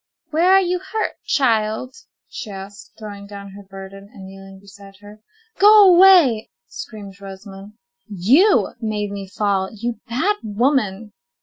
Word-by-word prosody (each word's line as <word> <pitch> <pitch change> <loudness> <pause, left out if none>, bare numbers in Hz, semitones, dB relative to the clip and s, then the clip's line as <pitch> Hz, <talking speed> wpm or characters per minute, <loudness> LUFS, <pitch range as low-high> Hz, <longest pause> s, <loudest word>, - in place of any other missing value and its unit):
"Where 335 +4 +2
are 385 - +6
you 360 -1 -1
hurt, 410 +4 -4
child?" 225 -2 0 0.3
she - - -8
asked, 200 +1 -11
throwing 205 -2 -10
down 200 -1 -10
her 200 +1 -12
burden 195 0 -12
and 195 - -12
kneeling 195 0 -13
beside 200 0 -16
her. 210 +1 -15 0.4
"Go 410 -2 +7
away," 345 - +5 0.2
screamed 200 - -10
Rosamond. 195 +1 -11 0.3
"You 245 - +3
made 210 -2 -3
me 200 -1 -7
fall, 195 -1 -1
you 230 +1 -5
bad 335 - 0
woman!" 220 -2 -1
210 Hz, 135 wpm, -19 LUFS, 195-260 Hz, 0.4 s, Go